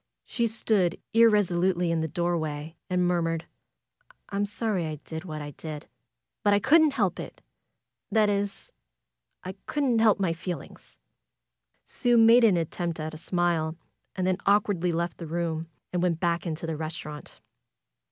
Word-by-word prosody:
She 235 -1 0
stood 210 -5 +1
irresolutely 185 -6 +3
in 165 -1 0
the 160 - -1
doorway 160 -2 -2
and 180 -1 +2
murmured: 165 -2 0 0.9
^M'm 205 +1 0
sorry 205 -5 -1
I 155 - -4
did 160 +2 -6
what 155 -3 -5
I 145 - -7
did; 150 0 -8 0.5
but 205 -2 +4
I - - +3
couldn't 300 +4 +5
help 195 -8 0
it. - - -8 0.7
That 215 -2 +4
is, 200 -1 -2 0.7
I 185 - -5
couldn't 270 -6 +1
help 220 -2 +4
my 185 -4 +1
feelings." 175 +1 -8 0.9
Sue 245 -2 +1
made 230 +2 +7
an 205 -6 +5
attempt 170 0 -3
at 155 +1 -4
a - - -7
smile, 170 -2 0 0.4
and 185 -1 -1
then 185 -1 +1
awkwardly 200 -3 +2
left 170 +1 -2
the 165 - -6
room, 165 0 -2 0.3
and 180 - 0
went 175 -2 +1
back 170 0 0
into 160 0 -4
the 160 -1 -2
restaurant. 155 -1 -7
175 Hz, 150 wpm, -27 LUFS, 165-205 Hz, 0.9 s, made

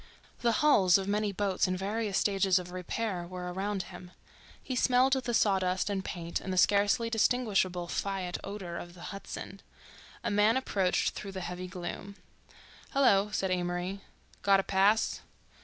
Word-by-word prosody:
The 235 - +2
hulls 190 -12 +6
of 195 0 -4
many 210 0 0
boats 195 -1 0
in 185 0 -1
various 205 +1 -1
stages 195 -2 +3
of 180 -1 -4
repair 185 0 -3
were 180 0 -6
around 195 +1 -2
him; 180 -1 -11 0.5
he 255 - -5
smelled 255 +2 +4 0.2
sawdust 190 -2 +2
and 195 -1 -2
paint 170 -3 -4
and 190 - -5
the 185 - -2
scarcely 205 +4 +3
distinguishable 205 -7 +1
fiat 190 -1 -3
odor 195 -4 -6
of 175 0 -10
the 175 +3 -8
Hudson. 195 0 -8 0.6
A - - -1
man 210 +4 +4
approached 195 -8 +1
through 195 -1 -7
the 190 - -5
heavy 180 +1 -5
gloom. 185 +2 -7 0.8
"Hello," 210 -8 +4
said 190 -2 -1
Amory. 180 +2 -2 0.4
"Got 195 -1 +4
a - - 0
pass?" 200 +3 +2
195 Hz, 155 wpm, -30 LUFS, 180-205 Hz, 0.8 s, hulls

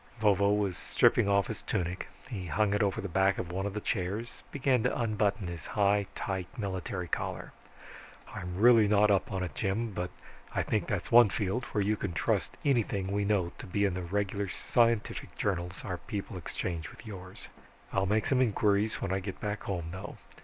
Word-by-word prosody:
Vovo 100 -2 +4
was 100 -4 +1
stripping 100 - +3
off 100 -1 +4
his - - -6
tunic. 90 +1 -2 0.2
He 100 -8 -5
hung 100 +6 +2
it 105 - +2
over 100 +2 +1
the 100 - -3
back 95 +2 +2
of 85 - -4
one 95 +2 -1
of 100 - -5
the - - 0
chairs, 105 +3 -3
began 135 -3 +2
to - - 0
unbutton 105 -3 +1
his 85 -3 -6
high, 100 -1 +2
tight 95 -3 -3
military 95 -3 -3
collar. - - -3 0.8
"I'm 90 0 -5
not 95 - -4
really 115 -4 +7
up 105 -1 +4
on 95 -2 -1
it, 90 - -4
Jim, 110 +3 -1
but 90 0 -2 0.5
I - - +2
think - - 0
that's - - -2
one 120 -2 +8
field 105 +6 -1
where 105 - -1
you 105 +2 +2
can 95 -4 -3
trust - - 0
anything 105 -8 +1
we 100 0 +1
know 100 -4 +1
to - - -7
be 100 +2 +1
in 95 - +1
the 90 - -3
regular 100 +2 -1
scientific 115 +1 +1
journals 90 -2 -2
our 90 -3 -3
people 100 -1 -5
exchange 85 -1 -4
with - - -14
yours. 95 -3 -9 0.4
I'll 95 0 +2
make 105 +2 +2
some 130 -2 +3
inquiries 105 -2 +2
when 95 - -1
I 95 - +1
get 95 0 -6
back 105 -1 -3
home, 85 -4 -3
though. 95 +3 -7
100 Hz, 195 wpm, -30 LUFS, 95-105 Hz, 0.8 s, one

